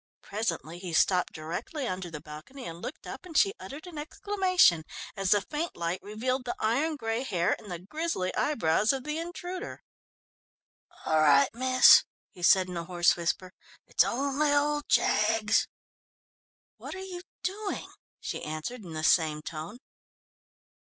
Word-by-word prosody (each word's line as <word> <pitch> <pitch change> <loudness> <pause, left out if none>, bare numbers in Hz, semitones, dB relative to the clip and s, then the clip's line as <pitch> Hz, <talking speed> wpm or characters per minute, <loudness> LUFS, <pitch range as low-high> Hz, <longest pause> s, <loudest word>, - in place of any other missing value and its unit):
Presently 175 -5 -3
he 180 -2 -6
stopped 180 +2 +3
directly 175 - -5
under 185 -1 -4
the 155 -2 -7
balcony 155 - -10
and 165 +1 -7
looked 265 - -7
up - - -7
and 350 -4 -4
she 395 -2 +4
uttered 295 +5 -9
an 340 -4 -8
exclamation, 365 - +2 0.3
as 195 -2 -1
the 205 +1 +5
faint 310 +9 -4
light 170 +2 -2
revealed 250 +6 -2
the 245 - -3
iron 280 +9 +1
grey 225 -3 -2
hair 180 -9 +1
and 210 - -12
the 175 - -3
grisly 195 - -3
eyebrows 215 - +2
of 265 -2 -4
the 300 +2 -3
intruder. 355 +2 -6 1.2
"All 160 0 +3
right, 145 -2 +5
miss," 255 +2 +7 0.3
he 180 - -14
said 185 +1 +5
in 180 -1 -5
a 170 - -4
hoarse 175 -1 +3
whisper, 180 +2 -2 0.3
"it's - - +3
only 280 +3 0
old 295 0 +1
Jaggs." 220 +1 +3 1.1
"What - - -8
are - - -7
you 365 -2 -7 0.2
doing?" 400 +2 -3 0.3
she - - -5
answered 155 +11 -5
in 170 -3 -9
the 155 0 -4
same 155 -2 +3
tone. 160 +8 -6
215 Hz, 155 wpm, -29 LUFS, -, 1.2 s, miss